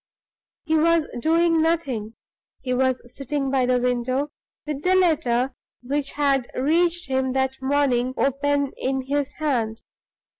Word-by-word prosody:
He 320 - 0
was 335 0 +3
doing 330 +3 +3
nothing. 270 -10 -1 0.5
He 255 -1 -1
was 260 0 +1
sitting 275 0 -2
by 260 -2 +2
the 250 0 +3
window, 250 +3 -1 0.3
with 300 -2 -4
the 370 +3 +3
letter 270 -8 +2 0.3
which 280 +2 -2
had 275 -4 +1
reached 340 +5 +1
him 260 -1 0
that 265 0 -1
morning 265 -2 +1
open 280 0 +1
in 265 0 -1
his 285 +1 -2
hand. 240 -7 -2
275 Hz, 135 wpm, -23 LUFS, 255-300 Hz, 0.5 s, was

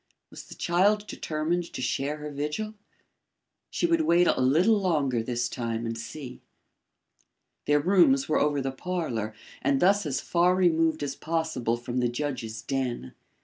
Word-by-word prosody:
Was - - -10
the - - -11
child 205 +4 +2
determined 165 0 -2
to - - -5
share 135 +4 -1
her 150 0 -7
vigil? 150 +10 -3 1.0
She - - -1
would 335 -1 +3
wait 175 - +4
a - - +2
little 175 - +4
longer 145 - +1
this 120 +1 -1
time 115 -2 -3
and 115 0 -3
see. 125 +3 -8 1.3
Their 145 0 +4
rooms 145 -5 +4
were 155 - +2
over 145 -1 +1
the 135 0 -2
parlour 130 - -3 0.3
and 140 0 +2
thus 195 +1 +3
as 135 -3 -1
far 175 +1 +2
removed 165 -4 +2
as 140 -1 -3
possible 155 -8 -1
from 120 +1 -5
the 120 -1 +1
judge's 120 -4 -4
den. 125 - -3
145 Hz, 155 wpm, -27 LUFS, 125-175 Hz, 1.3 s, wait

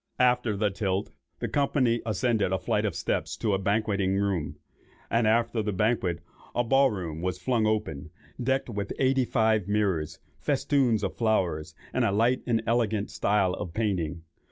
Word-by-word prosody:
After 125 -4 +2
the 105 0 +1
tilt, 95 0 -2 0.3
the - - -3
company 130 -4 +1
ascended 110 -2 +1
a 95 - +2
flight 95 - 0
of - - -1
steps - - -2
to 105 -3 0
a 95 - +1
banqueting 100 -1 +1
room, 95 -7 -1 0.6
and 115 -1 +3
after 115 +1 +2
the 105 0 -1
banquet, 95 -4 0 0.3
a 120 - +2
ball 135 +3 +4
room 85 -7 -5
was 90 0 -2
flung 110 +4 +1
open, 80 -9 -2 0.3
"decked 130 +2 0
with 100 -4 -4
eighty 130 -1 +2
five 110 -5 +2
mirrors, 95 -7 0 0.2
festoons 125 -7 +1
of 95 - -2
flowers, 85 -9 0 0.2
and - - +1
a - - +2
light 115 +5 +2
and 115 -2 +1
elegant 110 -3 0
style 100 -3 +1
of 90 -2 -6
painting." 90 -7 -1
105 Hz, 165 wpm, -27 LUFS, 95-115 Hz, 0.6 s, ball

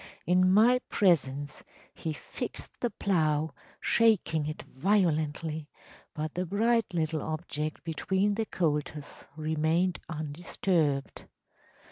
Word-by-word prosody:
In 185 +1 +4
my 230 +6 +6
presence 145 -7 +1 0.3
he 160 - -4
fixed 150 - -7
the 240 - 0
plough, 155 -8 +1 0.3
shaking 195 -9 +3
it 155 - -5
violently, 160 -3 0 0.5
but 155 -1 -3
the 180 - -1
bright 225 +4 +2
little 160 -3 -1
object 155 -1 -4
between 190 +5 0
the 220 +1 -2
colters 150 -3 -2
remained 160 +3 +1
undisturbed. 155 -1 -1
160 Hz, 100 wpm, -29 LUFS, 150-190 Hz, 0.5 s, my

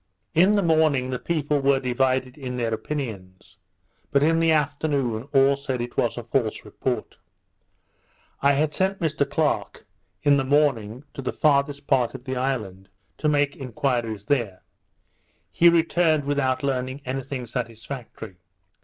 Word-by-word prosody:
In 185 +6 +5
the 200 - +2
morning, 155 -6 +2
the 125 - -2
people 150 -3 0
were 135 0 +3
divided 130 0 0
in 130 -4 -6
their 115 -2 -1
opinions; 110 -7 -6 0.5
but 140 0 +3
in 165 +2 +3
the 165 0 +3
afternoon, 145 -6 0
all 135 0 +5
said 135 -2 -4
it 120 0 -5
was 120 - 0
a 120 - -4
false 115 -1 -1
report. - - -4 1.2
I 140 +1 +4
had 150 +2 +1
sent 190 +1 0
Mr 150 -4 0
Clerke, 155 0 -1 0.4
in 145 -1 +5
the 135 - +1
morning, 130 -4 +1
to - - -6
the 130 - -2
farthest 140 -1 +1
part 130 -3 +1
of 125 - -8
the 130 0 -4
island, 110 -8 -3 0.3
to 150 - +1
make 145 -1 +1
enquiries 120 -5 -2
there; 115 -9 -1 0.9
he 170 - +6
returned 165 -2 +2
without 140 -2 0
learning 130 0 -2
any 130 +1 -2
thing 130 -1 -5
satisfactory. 115 -3 -7
135 Hz, 150 wpm, -24 LUFS, 125-145 Hz, 1.2 s, he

